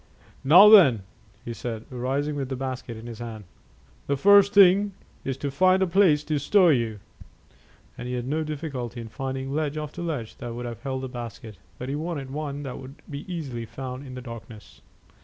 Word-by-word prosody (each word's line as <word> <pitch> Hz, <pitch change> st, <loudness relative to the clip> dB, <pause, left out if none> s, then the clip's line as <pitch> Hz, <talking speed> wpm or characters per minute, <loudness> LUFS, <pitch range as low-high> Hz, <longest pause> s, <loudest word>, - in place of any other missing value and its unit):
"Now 175 Hz, +9 st, +9 dB
then," 165 Hz, -, +7 dB, 0.4 s
he 120 Hz, -, -4 dB
said, 115 Hz, -1 st, -6 dB
rising 135 Hz, +4 st, -2 dB
with 135 Hz, -2 st, -3 dB
the 135 Hz, -, -2 dB
basket 130 Hz, -2 st, -5 dB
in 110 Hz, -, -10 dB
his 115 Hz, -2 st, -8 dB
hand, 115 Hz, -3 st, -7 dB, 0.6 s
"the 140 Hz, -, 0 dB
first 200 Hz, +5 st, +6 dB
thing 200 Hz, +1 st, +6 dB, 0.3 s
is 135 Hz, -1 st, -3 dB
to 140 Hz, 0 st, -3 dB
find 185 Hz, +6 st, +4 dB
a -, -, +3 dB
place 170 Hz, -5 st, +3 dB
to 150 Hz, -1 st, -1 dB
stow 180 Hz, +5 st, +4 dB
you;" 115 Hz, -7 st, +1 dB, 1.0 s
and 125 Hz, -, -5 dB
he 125 Hz, -, -3 dB
had 120 Hz, 0 st, -4 dB
no 155 Hz, +3 st, -1 dB
difficulty 140 Hz, -6 st, -5 dB
in 115 Hz, -1 st, -7 dB
finding 135 Hz, +4 st, -4 dB
ledge 155 Hz, 0 st, -1 dB
after 155 Hz, +3 st, -5 dB
ledge 150 Hz, -10 st, -4 dB
that 120 Hz, -3 st, -6 dB
would 120 Hz, +1 st, -5 dB
have 115 Hz, -1 st, -7 dB
held 130 Hz, 0 st, -4 dB
the -, -, -3 dB
basket, 115 Hz, -4 st, -8 dB, 0.2 s
but 125 Hz, -, -6 dB
he 135 Hz, -, -3 dB
wanted 145 Hz, -3 st, -4 dB
one 145 Hz, 0 st, -4 dB
that 135 Hz, -3 st, -6 dB
would 135 Hz, +2 st, -11 dB
be 145 Hz, +6 st, -7 dB
easily 130 Hz, -9 st, -5 dB
found 130 Hz, +3 st, -7 dB
in 130 Hz, -, -8 dB
the 125 Hz, -, -6 dB
darkness. 115 Hz, -3 st, -11 dB
135 Hz, 195 wpm, -25 LUFS, 120-155 Hz, 1.0 s, Now